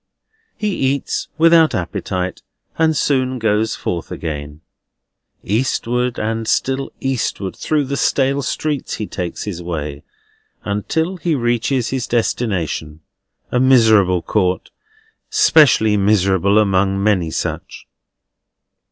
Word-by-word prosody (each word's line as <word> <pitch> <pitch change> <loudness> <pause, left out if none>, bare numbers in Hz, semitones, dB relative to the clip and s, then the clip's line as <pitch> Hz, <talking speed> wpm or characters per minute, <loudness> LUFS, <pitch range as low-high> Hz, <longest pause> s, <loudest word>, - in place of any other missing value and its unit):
He 210 - -1
eats 135 +1 -1
without 165 -1 +5
appetite, 90 +1 -3 0.3
and 160 -1 +2
soon 130 -2 +1
goes 110 -1 0
forth 85 -2 -4
again. 75 -1 -6 0.8
Eastward 125 +2 -1
and 110 +1 -2
still 135 +1 0
eastward 125 -7 -2
through 150 -2 0
the 140 +1 -3
stale 140 +1 +1
streets 145 +1 -2
he 105 - -4
takes 90 -4 -5
his 90 -5 -5
way, 75 -4 -5 0.6
until 160 - -2
he 170 -2 0
reaches 120 0 0
his 130 -3 -2
destination: 90 -10 -2 0.5
a 125 - +1
miserable 110 -9 +4
court, 95 -3 -1 0.6
specially 150 - +4
miserable 100 -1 +2
among 95 -1 +2
many 95 -6 +2
such. - - -5
110 Hz, 110 wpm, -18 LUFS, 95-135 Hz, 0.8 s, without